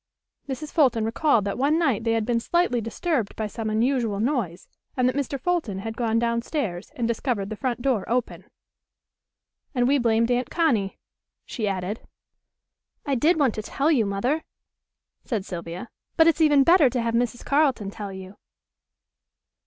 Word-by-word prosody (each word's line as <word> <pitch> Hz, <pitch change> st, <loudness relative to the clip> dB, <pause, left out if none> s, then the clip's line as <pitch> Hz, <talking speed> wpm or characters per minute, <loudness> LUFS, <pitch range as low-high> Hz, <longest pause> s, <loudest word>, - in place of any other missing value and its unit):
Mrs. 295 Hz, +3 st, -5 dB
Fulton 250 Hz, -8 st, +3 dB
recalled 230 Hz, -1 st, +2 dB
that 200 Hz, +4 st, -3 dB
one 290 Hz, +4 st, +3 dB
night 270 Hz, -10 st, +1 dB
they 225 Hz, -, +2 dB
had 225 Hz, -1 st, 0 dB
been 235 Hz, 0 st, +1 dB
slightly 300 Hz, -2 st, +1 dB
disturbed 230 Hz, -, -2 dB
by 220 Hz, -, -2 dB
some 220 Hz, +1 st, -4 dB
unusual 225 Hz, -2 st, +1 dB
noise 225 Hz, -, -1 dB, 0.3 s
and 250 Hz, -1 st, +3 dB
that 255 Hz, -, 0 dB
Mr. 280 Hz, -1 st, -2 dB
Fulton 320 Hz, -, -1 dB
had 225 Hz, +3 st, -5 dB
gone 230 Hz, -1 st, 0 dB
down 235 Hz, 0 st, +1 dB
stairs 215 Hz, -, -3 dB
and 235 Hz, -2 st, -1 dB
discovered 225 Hz, -3 st, -2 dB
the -, -, -3 dB
front 240 Hz, +2 st, -3 dB
door 250 Hz, -8 st, +1 dB
open. 245 Hz, +1 st, -2 dB, 1.3 s
"And 245 Hz, -1 st, +2 dB
we 280 Hz, +1 st, +3 dB
blamed 230 Hz, 0 st, +2 dB
Aunt 245 Hz, +1 st, 0 dB
Connie," 235 Hz, -, +1 dB, 0.5 s
she 220 Hz, -5 st, -3 dB
added. 195 Hz, +2 st, -2 dB, 1.1 s
"I 285 Hz, -, 0 dB
did 315 Hz, +7 st, +3 dB
want 265 Hz, -6 st, +3 dB
to 215 Hz, -, -4 dB
tell 280 Hz, +8 st, 0 dB
you, 235 Hz, -9 st, +2 dB
Mother," 245 Hz, +11 st, -1 dB, 0.8 s
said 215 Hz, -7 st, -3 dB
Sylvia, 175 Hz, +3 st, -6 dB, 0.3 s
"but 325 Hz, -, +7 dB
it's 330 Hz, 0 st, +3 dB
even 295 Hz, -3 st, +5 dB
better 335 Hz, -3 st, +6 dB
to 245 Hz, 0 st, -1 dB
have 230 Hz, 0 st, -1 dB
Mrs. 240 Hz, 0 st, -1 dB
Carleton 275 Hz, -9 st, +1 dB
tell 205 Hz, -1 st, -6 dB
you." 190 Hz, +1 st, -10 dB
235 Hz, 170 wpm, -25 LUFS, 215-275 Hz, 1.3 s, but